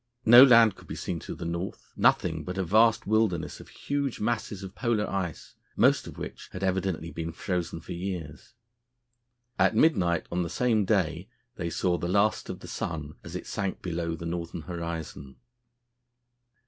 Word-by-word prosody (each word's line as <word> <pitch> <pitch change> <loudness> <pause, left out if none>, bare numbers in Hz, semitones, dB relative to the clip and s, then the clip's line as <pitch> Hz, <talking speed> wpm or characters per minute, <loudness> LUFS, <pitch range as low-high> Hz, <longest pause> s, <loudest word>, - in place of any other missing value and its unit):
No 120 +3 +10
land 115 -6 +7
could - - -16
be - - -6
seen 85 - -4
to - - -7
the 85 - -7
north; 85 +3 -5
nothing 80 -3 +2
but 90 +4 -5
a 95 - +1
vast 110 +6 +4
wilderness 105 -7 0
of - - -12
huge 140 -3 -3
masses 110 -3 -2
of 95 -1 -8
Polar 115 -3 0
ice, 95 -4 -4 0.2
most - - +3
of - - -10
which - - -8
had 95 - -5
evidently 95 -3 -1
been 85 0 -4
frozen 85 -1 -3
for - - -10
years. 85 - -6 1.0
At - - +4
midnight 90 - +3
on 90 - 0
the 85 - -2
same 110 +2 +1
day 90 -1 0 0.3
they 85 -1 -3
saw 85 +1 0
the 85 - -2
last 100 +3 +2
of - - -6
the - - -9
sun 75 -2 -4
as 85 +1 -8
it 90 - -5
sank 100 -3 -3
below 85 -1 -2
the 85 - -8
northern 85 0 -4
horizon. 80 -4 -6
90 Hz, 175 wpm, -28 LUFS, 85-105 Hz, 1.0 s, No